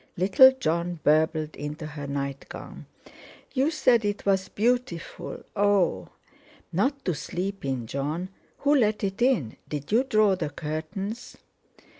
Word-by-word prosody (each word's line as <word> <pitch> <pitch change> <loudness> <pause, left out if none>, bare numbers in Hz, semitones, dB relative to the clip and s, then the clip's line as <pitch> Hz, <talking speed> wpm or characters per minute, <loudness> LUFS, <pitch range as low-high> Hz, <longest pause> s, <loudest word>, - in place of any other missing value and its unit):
Little 195 +9 +7
Jon 170 0 -1
burbled 155 0 +2
into 150 +2 -6
her 145 -2 -6
nightgown 140 -1 -6 0.7
"You 270 +3 +2
said 250 -7 +3
it 205 0 -2
was 190 -1 +1
beautiful. 235 -6 -2
Oh!" 195 - +2 0.6
"Not 265 - 0
to 180 - +1
sleep 190 +6 -4
in, 130 -4 -2
Jon. 150 +9 -3 0.3
Who 285 +1 +3
let 215 -6 +2
it 195 +2 -2
in? 240 - +2
Did 145 +2 -5
you 235 +4 +4
draw 215 -6 +3
the 180 - -3
curtains?" 170 - -5
185 Hz, 130 wpm, -26 LUFS, 150-215 Hz, 0.7 s, Little